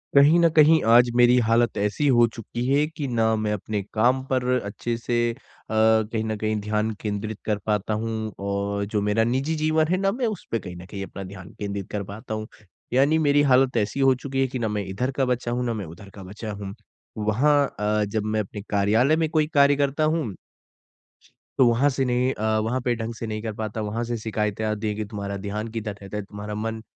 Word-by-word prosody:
कहीं 145 +5 +7
ना 170 - +6
कहीं 155 0 +5
आज 120 +1 +6
मेरी 120 0 +6
हालत 115 +1 +2
ऐसी 105 +8 0
हो 120 -3 +5
चुकी 120 +2 -5
है 140 +2 +3
कि 150 -3 -5
ना 115 -2 +2
मैं 110 -1 -1
अपने 105 0 -3
काम 125 +4 +2
पर 130 -2 0 0.2
अच्छे 110 +3 -3
से 120 0 -2
अ, - - -9 0.4
कहीं 110 0 +2
ना 110 0 -2
कहीं 110 0 +1
ध्यान 105 +1 -1
केंद्रित 105 0 -4
कर 105 -1 0
पाता 105 0 0
हूँ 115 - -2 0.4
और 100 0 -1
जो 105 0 -1
मेरा 105 +2 +2
निजी 135 +7 0
जीवन 155 0 +2
है, 180 +3 +1
ना 195 +1 +1
मैं 240 +3 -1
उस 215 -4 -5
पे 115 - +1
कहीं 90 -3 -8
ना 90 +1 -10
कहीं 100 +1 -6
अपना 95 0 -8
ध्यान 95 -1 -10
केंद्रित 100 -1 -4
कर 105 -1 -2
पाता 110 +4 -7
हूँ। 110 0 -4 0.5
यानी 140 +5 +4
मेरी 145 -2 +4
हालत 130 -1 +4
ऐसी 105 +5 -1
हो 135 -1 +5
चुकी 135 +1 -3
है 135 - +2
कि 130 0 -5
ना 115 - 0
मैं 105 -1 -2
इधर 105 +8 -2
का 135 0 0
बचा 125 -1 -1
हूँ, 125 +1 -1
ना 120 - -1
मैं 105 -4 -4
उधर 85 +5 -12
का 100 0 -11
बचा 105 +4 -7
हूँ। 100 -1 -6 0.4
वहाँ 135 +7 +2
अ, 105 0 +1
जब 105 +1 -2
मैं 110 0 0
अपने 105 0 -5
कार्यालय 110 +8 +3
में 160 -1 0
कोई 155 -1 +2
कार्य 140 0 +5
करता 140 +2 0
हूँ 155 - 0 1.2
तो 130 - +6
वहाँ 120 +5 +3
से 135 -1 -1
नहीं 125 +1 +1
अ, 110 0 0
वहाँ 115 +4 -1
पे 125 0 +1
ढंग 115 0 -4
से 115 - -5
नहीं 110 0 -4
कर 110 -1 -4
पाता। 110 0 -4
वहाँ 110 +3 -2
से 120 0 -3
शिकायतें 110 -1 -2
आती 105 0 -2
है 105 - 0
कि, 110 0 -3
"तुम्हारा 100 -1 -5
ध्यान 105 +2 -3
किधर 110 -2 -4
रहता 100 +1 -6
है? 105 - -3
तुम्हारा 105 +1 -7
मन 110 +1 -3
110 Hz, 225 wpm, -24 LUFS, 105-130 Hz, 1.2 s, कहीं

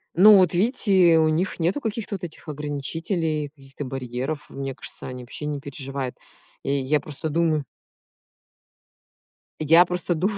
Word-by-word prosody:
Ну 205 +4 +9
вот 185 -3 +5
видите, 190 -4 +4
у 160 - +4
них 175 +4 -1
нету 175 - 0
каких-то 220 -2 -3
вот 180 - -8
этих 160 - -10
ограничителей, 150 +2 -2
каких-то 140 -1 -10
барьеров. 130 +3 -4
Мне 135 -1 -5
кажется - - -7
они 125 -1 -7
вообще 125 +4 -5
не 150 -1 -2
переживают. 135 -2 -5 0.5
И - - -2
я 140 +2 +1
просто 155 +1 -5
думаю 160 -2 +1 2.0
я 165 +3 +7
просто 180 0 -2
дум 180 +6 +1
155 Hz, 145 wpm, -24 LUFS, 140-175 Hz, 2.0 s, Ну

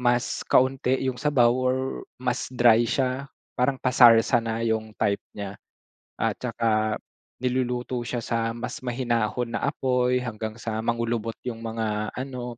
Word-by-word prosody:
mas 120 0 +1
kaunti 130 0 +3
yung 125 - -2
sabaw 140 -5 +4
or 130 0 +1 0.4
mas 125 0 -1
dry 120 -1 +5
siya, 130 +3 -1 0.3
parang 130 +1 +2
pasarsa 120 -1 +6
na 115 0 -2
'yong 110 -1 -1
type 100 -2 +1
niya, 100 -1 -5 0.6
at - - 0
saka 110 -2 0 0.4
niluluto 125 -1 -1
siya 120 0 -3
sa 115 -1 -1
mas 125 +1 -5
mahinahon 120 -1 -1
na - - -2
apoy 125 -3 +1
hanggang 110 -2 -4
sa 110 -1 -3
mangulubot 115 -1 -1
'yong 120 -3 -3
mga 110 -2 -2
ano, 125 -2 -5
120 Hz, 140 wpm, -25 LUFS, 115-125 Hz, 0.6 s, pasarsa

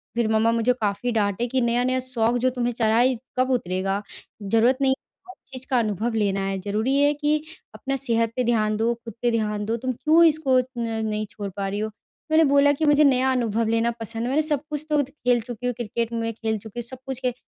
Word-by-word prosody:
फिर 235 -2 +1
मम्मा 225 +1 +3
मुझे 230 +2 +2
काफ़ी 210 +4 -1
डाँटे 210 +1 0
कि 260 +1 0
नया-नया 245 +2 +1
शौक 245 -2 0
जो - - +5
तुम्हें 245 -1 -2
चढ़ा 225 -1 +1
है 255 +1 +4 0.2
कब 255 +1 +2
उतरेगा? 195 -3 -1 0.4
ज़रूरत 230 +5 +3
नहीं 265 -1 +3
है - - +2 0.3
हर 370 - -10 0.2
चीज़ 255 0 -7
का 255 -2 +3
अनुभव 220 +1 -1
लेना 200 -2 0
है 195 0 -2
ज़रूरी 215 +7 -1
है 290 +1 +4
कि 295 +1 +1 0.4
अपना 275 0 -3
सेहत 230 -4 0
पे 250 - 0
ध्यान 215 -3 +1
दो, 230 +2 +1
खुद 230 -2 -11
पे 240 -1 +2
ध्यान 210 -2 -1
दो, 225 - -1
तुम 255 +2 -2
क्यों 310 +7 +4
इसको 300 -5 +3
न 245 -2 -4 0.2
नहीं 215 0 -2
छोड़ 205 -5 -6
पा 195 -1 -2
रही 200 +2 -3
हो। 215 0 -2 0.4
मैंने 320 +1 +6
बोला 285 0 +4
कि 315 - +2
मुझे 295 0 +5
नया 265 -2 +3
अनुभव 230 -3 0
लेना 230 +1 +1
पसंद 225 0 -5
है 245 - -1
मैंने 295 +4 +2
सब 295 -3 -1
कुछ 300 0 -4
तो 300 -1 +3
खेल 250 -4 0
चुकी 240 +1 -8
हूँ 245 - 0
क्रिकेट 235 0 -3
मै 230 0 -1
खेल 220 0 -2
चुकी 220 +3 -9
हूँ - - -3
सब 260 - -7
कुछ 265 -2 -4
खेल। 250 -1 -1
240 Hz, 235 wpm, -24 LUFS, 220-260 Hz, 0.4 s, मैंने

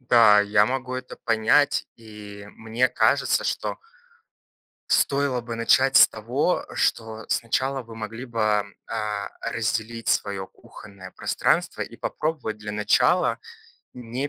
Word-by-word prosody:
Да, 115 -4 +6
я 105 0 +3
могу 130 0 -3
это 130 0 -6
понять, 115 +5 +2
и 105 -2 -11
мне 115 +3 0
кажется, - - +2
что - - -2 1.1
стоило 140 -3 +1
бы 115 0 -6
начать 130 +3 +4
с - - +9
того, 125 +10 -1
что 110 0 -1
сначала 130 +3 -1
вы 115 0 -12
могли 115 +3 -7
бы, 110 -4 +1 0.2
а, 105 -2 -3
разделить 115 0 -3
свое 100 -2 0
кухонное 100 -3 -14
пространство - - 0
и - - -7
попробовать 150 -9 -3
для 105 0 -7
начала 105 - +2 0.6
не 125 +3 -4
115 Hz, 120 wpm, -24 LUFS, 105-125 Hz, 1.1 s, с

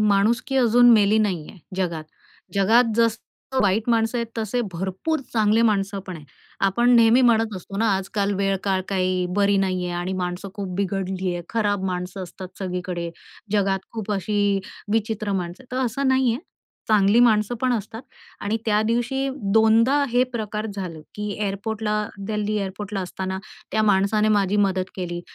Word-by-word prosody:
माणुसकी 215 +6 +2
अजून 245 -1 +6
मेली 210 -1 +5
नाहीये 190 -8 -2 0.2
जगात. 170 -4 -2 0.5
जगात 225 +4 +4
जसं 230 +3 -1
वाईट 205 +3 +1
माणसं 225 +1 +1
आहेत, 235 - -1
तसे 225 +2 -1
भरपूर 190 - -2
चांगले 220 0 +3
माणसं 200 -2 +1
पण 185 -2 -6
आहेत. 150 -2 -13 0.4
आपण 240 +6 +2
नेहमी 230 +2 +6
म्हणत 225 -3 +3
असतो 190 +2 -8
ना, 225 +2 +2
आजकाल 200 +1 -1
वेळ-काळ 195 -1 0
काही 185 -1 0
बरी 200 0 +3
नाहीये 185 -2 -1
आणि 180 +2 -3
माणसं 180 +2 -4
खूप 195 -3 -5
बिघडली 190 -1 -2
आहे. 175 - -4
खराब 205 -4 0
माणसं 180 +1 -3
असतात 185 +1 -10
सगळीकडे. 180 -2 -4 0.4
जगात 195 -2 +1
खूप 220 -2 -5
अशी 205 0 +1 0.3
विचित्र 215 -2 -1
माणसं 180 +3 -4
आहेत, 255 - -21
तर 260 - +1
असं 265 +4 -1
नाहीये, 260 -3 +2 0.5
चांगली 210 +1 +4
माणसं 220 -1 +3
पण 255 -1 +2
असतात. 225 +1 -4 0.4
आणि 210 +2 -1
त्या 210 -1 +3
दिवशी 255 +4 0 0.2
2दा 225 +4 +5
हे 245 +1 +3
प्रकार 215 -2 -3
झालं, 180 -5 -5
की 210 - -5
एअरपोर्टला- 210 +1 -2 0.3
दिल्ली 210 0 -1
एअरपोर्टला 200 0 -4
असताना 190 +1 -4 0.3
त्या 215 - +2
माणसाने 210 +1 +3
माझी 200 0 +1
मदत 190 -2 +1
केली 175 -2 -4
205 Hz, 155 wpm, -23 LUFS, 190-225 Hz, 0.5 s, अजून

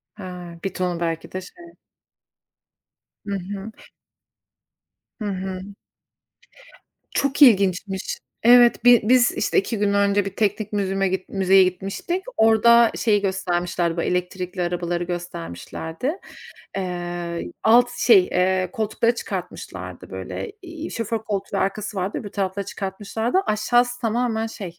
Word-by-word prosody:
He, 205 - -10 0.4
1 195 - -3
ton 180 -2 -2
belki 165 -1 -3
de 185 - -4
şey. 195 - -14 1.7
Hı 200 -1 -2
hı. 200 +3 -7 1.5
Hı - - -2
hı. 185 -1 -4 1.5
Çok 280 +1 -1
ilginçmiş. 195 -5 +4 0.3
Evet, 240 -1 +6
bi 245 -2 +8
biz 245 +2 +4
işte - - -1
2 215 +3 -3
gün 200 0 +1
önce 200 0 +2
bir 195 -1 -6
teknik 210 0 -1
museum'a 195 -1 0 0.2
müzeye 190 -1 +5
gitmiştik. 195 - -2
Orada 230 +1 +6
şeyi 210 -3 +2
göstermişlerdi, 175 -3 -1
bu 170 - +1
elektrikli 180 0 -2
arabaları 175 0 -1
göstermişlerdi. 170 - -5 0.7
Eee, 175 -2 -4
alt 245 +2 +5
şey, 205 -7 +6
eee, 185 0 +1
koltukları 225 +2 0
çıkartmışlardı - - -7
böyle. 420 - -6
Eee, 330 -2 -7
şoför 230 -1 -2
koltuğu 200 -1 -3
ve - - +1
arkası 200 +2 -2
vardı. 190 +2 -2
Öbür 205 - -7
tarafları 195 0 -2
çıkartmışlardı. 205 - -2
Aşağısı 240 +3 +1
tamamen 225 -1 0
şey 185 -6 -8
195 Hz, 120 wpm, -23 LUFS, 180-225 Hz, 1.7 s, bi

